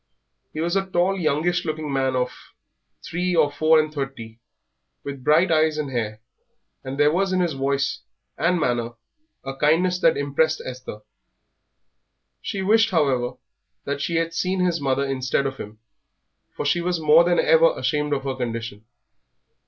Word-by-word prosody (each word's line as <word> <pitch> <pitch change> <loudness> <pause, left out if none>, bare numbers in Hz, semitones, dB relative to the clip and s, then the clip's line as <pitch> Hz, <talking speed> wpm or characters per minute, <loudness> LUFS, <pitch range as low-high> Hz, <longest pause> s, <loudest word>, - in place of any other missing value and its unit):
He 155 - -7
was 170 +3 -1
a 195 -1 0
tall, 185 +1 +1
youngish 170 +2 0
looking 155 -2 -4
man 135 -1 0
of 125 0 0 0.7
three 180 +1 -1
or 150 -3 +3
four 155 +2 +4
and 155 0 -1
thirty, 125 -6 -6 0.6
with 140 -2 -7
bright 155 +6 +3
eyes 155 -1 +2
and 145 -3 -3
hair, 110 -3 -3 0.6
and 130 +1 -6
there 145 0 +5
was 190 +3 0
in 185 - +1
his 175 -3 0
voice 135 +1 -1 0.4
and 175 +2 +1
manner 120 -4 -1 0.5
a 135 0 -6
kindness 170 +6 +2
that - - +3
impressed 145 +3 +1
Esther. 130 -4 -8 1.4
She 195 - -4
wished, 225 +3 +4
however, 135 - 0 0.5
that 140 0 -3
she 170 - -2
had 165 0 0
seen 185 +2 -1
his 175 -3 0
mother 135 0 0
instead 135 0 -1
of 135 0 -3
him, 105 -2 -9 0.8
for - - -4
she 170 +4 +1
was 175 0 -1
more 155 +2 +6
than 175 0 +2
ever - - +4
ashamed 150 -1 -1
of 140 -2 -1
her 135 -1 -2
condition. 115 -4 -5
150 Hz, 160 wpm, -23 LUFS, 135-175 Hz, 1.4 s, more